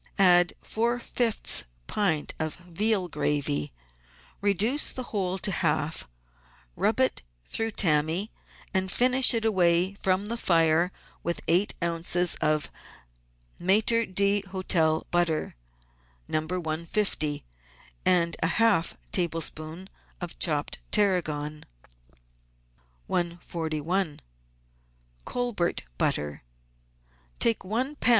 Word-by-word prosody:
Add 175 -3 +6
four 235 +2 0
fifths 230 - +1 0.2
pint 175 -8 0
of 155 -1 -2
veal 185 +3 0
gravy, 140 - -1 0.7
reduce 205 - +2
the 255 - -4
whole 190 -2 -1
to 195 - +1
half, 160 - -1 0.7
rub - - +1
it - - +2 0.2
through 225 0 -1
tammy, 165 +4 +1 0.4
and 190 -1 0
finish 255 +3 +4
it 225 -1 0
away 180 -3 +3
from 195 0 0
the 230 +3 -3
fire 165 -2 +3 0.3
with 170 0 -2
eight 180 +5 +2
oz. 170 +1 +1
of 155 0 +1 0.9
Maitre 220 +5 +2
d' 200 +1 +1
Hotel 170 -4 +1
butter 175 -3 +1 0.7
(No. 155 0 -1
150) 165 -2 -1 0.6
and 170 -2 +3
half 175 +1 +2
a - - -31
tablespoonful 165 0 -1 0.3
of - - -7
chopped - - 0
tarragon. 155 -7 0 1.4
141— 170 -1 -2 1.1
COLBERT 240 -8 -1 0.2
BUTTER 75 0 0 1.0
Take 230 -4 +3
one 250 +9 -2
lb. - - 0
180 Hz, 100 wpm, -27 LUFS, 160-205 Hz, 1.4 s, Add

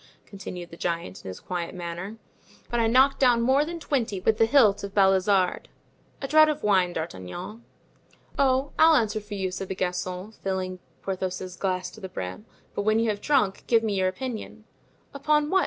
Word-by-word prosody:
continued 180 -3 -8
the 170 - -10
giant, 170 - -3
in - - -7
his 95 - -7
quiet 175 -1 -4
manner; 175 +4 -6 0.5
"but 240 - +1
I 230 - +3
knocked 260 +4 +4
down 245 -3 +5
more 265 +4 +4
than 335 +2 -5
twenty 245 - -1
with 215 +3 +1
the 225 - +5
hilt 225 -7 +4
of 200 0 -6
Balizarde. 190 -1 +3 0.6
A - - -1
draught 310 +2 +6
of 300 0 -3
wine, 185 -4 +3
D'Artagnan." 170 - -6 0.7
"Oh, 270 0 +2
I'll 320 0 +7
answer 215 -5 +1
for 205 0 -8
you," 190 -2 -2
said 190 +1 -5
the 190 - -4
Gascon, 180 +2 -3
filling 185 -3 -4 0.2
Porthos's 185 -1 -4
glass 185 -1 -2
to 220 - -14
the 190 - -6
brim; 95 - -6 0.3
"but - - -2
when 215 +2 +2
you 225 -1 +2
have 205 -1 -6
drunk, 260 -10 +1
give 230 -1 +4
me 215 -2 0
your 190 -1 +1
opinion." 225 0 -5 0.5
"Upon 300 +1 +1
what?" 380 - +5
205 Hz, 190 wpm, -26 LUFS, 185-245 Hz, 0.7 s, I'll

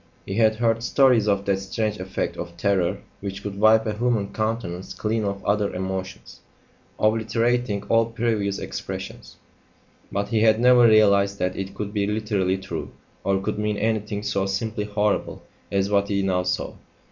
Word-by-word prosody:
He 95 - -5
had 110 +1 +3
heard 115 0 +1
stories 125 -3 +3
of 100 -1 +1
that 100 -1 +1
strange 105 +2 -2
effect 95 0 -3
of 85 0 -7
terror 95 0 +1 0.2
which 100 0 -6
could 100 -1 -5
wipe 110 +1 +5
a 110 - -1
human 110 -3 0
countenance 110 -5 -3
clean 110 0 -1
of 100 -1 -3
other 100 0 +1
emotions, 95 +1 -5 0.6
obliterating 115 0 +1
all 115 +1 +2
previous 110 -4 -1
expressions; - - -7 0.8
but 100 +1 -2
he 110 -2 +1
had 110 0 +4
never 125 0 +6
realised 100 -2 +4
that 90 0 -1
it 95 0 -5
could 105 -1 -5
be 100 -2 0
literally 105 -3 0
true, 95 - -6 0.3
or 95 0 +1
could 105 +2 -3
mean 105 -1 -1
anything 105 -2 -1
so 100 -2 -1
simply 105 +2 -2
horrible 105 0 -1 0.3
as 100 0 0
what 100 -1 +2
he 100 -1 0
now 95 -1 +1
saw. 90 0 -2
105 Hz, 165 wpm, -24 LUFS, 100-110 Hz, 0.8 s, never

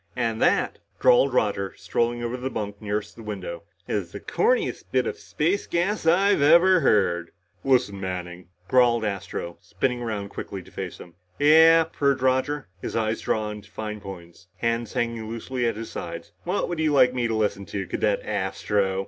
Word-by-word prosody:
"And 115 -3 -1
that," - - +2 0.2
drawled 135 +3 +5
Roger, 100 -5 0
strolling 120 +7 -1
to 120 +1 -2
the 130 +1 -3
bunk 105 -3 -5
nearest 105 0 -3
the 115 - -11
window, 95 -5 -6 0.3
"is 95 -5 -3
the 100 - -6
corniest 470 - 0
bit - - +2
of 450 -1 -4
space 185 - -1
gas 175 +1 0
I've 195 +1 +4
ever 170 +5 +6
heard." 90 - +2 0.3
"Listen, 125 -7 +2
Manning!" 90 -1 -5 0.2
growled 120 -3 +4
Astro, 95 -4 -4
spinning 125 -2 -2
around 105 -4 -3
quickly 95 -1 -7
to - - -17
face - - -6
him. 85 - -12 0.2
"Yeah," 160 +3 +7
purred 140 -4 0
Roger, 130 +3 +1
his - - -5
eyes 110 -1 0
drawn 105 -1 -2
to - - -19
fine 105 -1 -6
points, 90 -2 -11
hands 115 -1 -1
hanging 115 -2 -2
loosely 120 +2 -2
at 115 - -1
his 115 0 -6
sides. - - -7
"What - - 0
would 175 -2 -4
you 155 -1 +2
like 125 -3 +5
me 125 -2 0
to 115 - -1
listen 105 -2 -1
to, 95 -2 -4
Cadet 100 +3 0
Astro?" 95 -1 -1
115 Hz, 175 wpm, -25 LUFS, 100-135 Hz, 0.3 s, Yeah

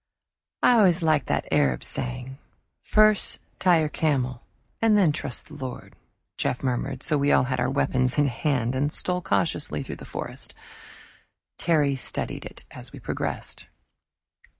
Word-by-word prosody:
"I 245 -2 +6
always 180 -4 +4
liked 155 -3 +2
that - - -1
Arab 65 -4 +2
saying, 130 +1 -3 0.4
'First 215 -1 +3 0.2
tie 175 -3 +4
your 155 - 0
camel 130 -6 0 0.4
and 220 -2 +5
then 185 -7 +4
trust 130 -4 -4
in 150 - -9
the 135 - -7
Lord,'" 125 -2 -7 0.4
Jeff 125 - -1
murmured; 130 +1 -2
so 150 -3 +2
we 140 +1 +2
all - - +5
had 130 0 -2
our 130 - +1
weapons 130 -1 +1
in 145 - +4
hand, 125 -1 0
and 140 +3 0
stole 180 +2 -2
cautiously 100 - 0
through - - -7
the - - -10
forest. - - -5 1.0
Terry 150 -5 +2
studied 125 - -3
it - - -10
as - - -10
we - - -10
progressed. - - -4
140 Hz, 155 wpm, -25 LUFS, 125-160 Hz, 1.0 s, I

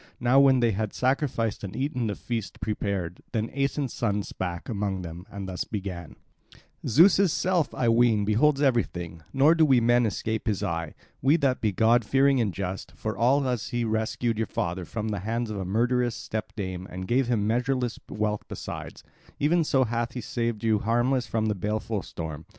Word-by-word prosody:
Now 125 +2 +4
when 135 -2 +5
they 120 -1 +3
had 105 0 -2
sacrificed 125 -5 0
and 95 - -6
eaten 130 -4 -1
the 105 - -2
feast 115 -4 -5
prepared, 100 -5 -3
then 110 0 -1
Aeson's 140 -1 -1
son 105 -3 0
spake 90 -3 -5
among 100 -4 -2
them 85 +2 -8
and 100 -1 -6
thus 90 -1 -3
began: 95 -6 -6 0.7
"Zeus' 180 - +5
self, 180 -2 +1
I 120 - 0
ween, 115 -3 +4
beholds 135 +7 +3
everything; 90 - 0
nor 140 +4 +5
do 165 -1 +3
we 135 -5 +5
men 120 0 +3
escape 110 +2 -3
his 105 -3 0
eye, 85 -2 -3 0.3
we 140 +4 +4
that 135 -5 +1
be 110 - +2
god 115 +4 +3
fearing 135 +3 +3
and 105 -4 0
just, 95 +1 -5
for 110 0 -4 0.3
as 125 -4 -2
he 120 -1 -1
rescued 110 +1 -1
your 115 - 0
father 85 +1 -3
from 110 +3 -4
the 105 -2 -2
hands 115 +4 -2
of 105 - -4
a 95 - -3
murderous 120 +4 +1
step 110 -1 -5
dame 95 -2 -4
and 95 +1 -6
gave 125 +3 +2
him 115 -4 +1
measureless 125 +1 0
wealth 105 -1 -1
besides; - - -7 0.4
even 165 +4 +3
so 135 -3 +2
hath 120 0 -2
he 125 - -4
saved 115 -3 -2
you 110 -2 +3
harmless 120 +4 +1
from 110 -1 0
the 110 - +1
baleful 105 +2 -2
storm. 80 -3 -7
115 Hz, 185 wpm, -26 LUFS, 100-125 Hz, 0.7 s, when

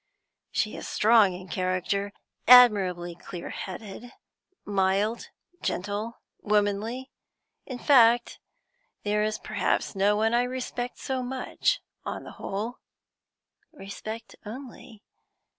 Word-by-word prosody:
She - - -1
is - - -7
strong 215 -3 +4
in 180 +1 -9
character, 185 +2 -1 0.4
admirably 195 -8 +6
clear 175 +1 -8
headed, 210 +5 -7 0.5
mild, 200 +3 +1 0.3
gentle, 205 +4 -3 0.2
womanly; 210 +5 0 0.6
in 255 - -5
fact, 240 -3 +4 0.6
there 210 0 +1
is 215 +1 0
perhaps 210 -1 -1
no 200 +2 +3
one 220 +2 +1
I 240 - +4
respect 250 -1 -4
so 260 -1 -3
much, 260 - -1 0.2
on - - -5
the - - -9
whole." 220 +6 -4 0.9
"Respect, 220 -1 -8
only?" 240 -1 -10
215 Hz, 105 wpm, -27 LUFS, 200-245 Hz, 0.9 s, admirably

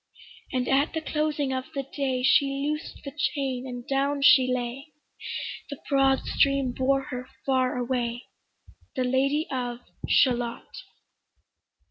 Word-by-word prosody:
And 255 -2 -1
at 275 +3 +2
the 320 - -2
closing 300 -3 -1
of 260 0 -2
the 275 - -1
day 265 -2 -2
She 280 +2 +5 0.2
loosed 300 +1 -4
the 275 - -6
chain, 270 -3 -1
and 245 -1 -7
down 275 +1 0
she 265 -3 +7
lay; 250 +4 -3 0.8
The 285 - -6
broad 270 -1 +3
stream 275 -2 +2
bore 270 +2 +1
her 250 0 -5 0.2
far 260 -2 +1
away, 245 -1 -2 0.7
The 255 - +1
Lady 275 +4 +1
of 245 -2 -3 0.3
Shalott. 240 -3 +2
265 Hz, 130 wpm, -26 LUFS, 250-280 Hz, 0.8 s, she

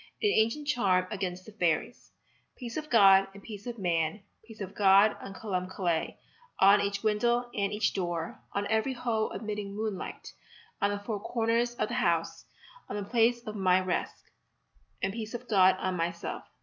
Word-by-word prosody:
AN 415 - +4
ANCIENT 230 - +1
CHARM 190 -10 +2
AGAINST 185 -3 -4
THE 220 - -11
FAIRIES 175 +1 -1 0.5
Peace 235 -3 -7
of 305 0 -5
God 195 -4 +6
and 200 - -12
peace 210 0 -9
of 240 -1 -5
man, 170 0 -1 0.2
Peace 220 -1 -14
of 195 -2 -6
God 200 +1 +5
on 195 - -8
Columb 185 -4 -3
Killey, 175 -4 -1 0.4
On 200 +1 +6
each 200 0 -2
window 240 +3 +1
and 200 -1 -1
each 210 0 0
door, 175 -3 -3
On 200 0 -1
every 220 +5 0
hole 230 -3 -1
admitting 205 -1 -5
moonlight, 210 -3 -5 0.5
On 200 - +3
the 205 - -1
four 205 +1 -4
corners 230 +2 0
of - - -1
the 240 - -6
house, 170 -2 0 0.4
On - - -4
the 205 -1 -4
place 235 +1 +2
of 215 -1 -6
my 185 -2 +3
rest, 185 -1 -3 0.8
And 195 - 0
peace 220 +1 -5
of 245 +1 -7
God 190 -3 +5
on 185 -1 -2
myself. 170 0 -3
205 Hz, 175 wpm, -29 LUFS, 190-225 Hz, 0.8 s, God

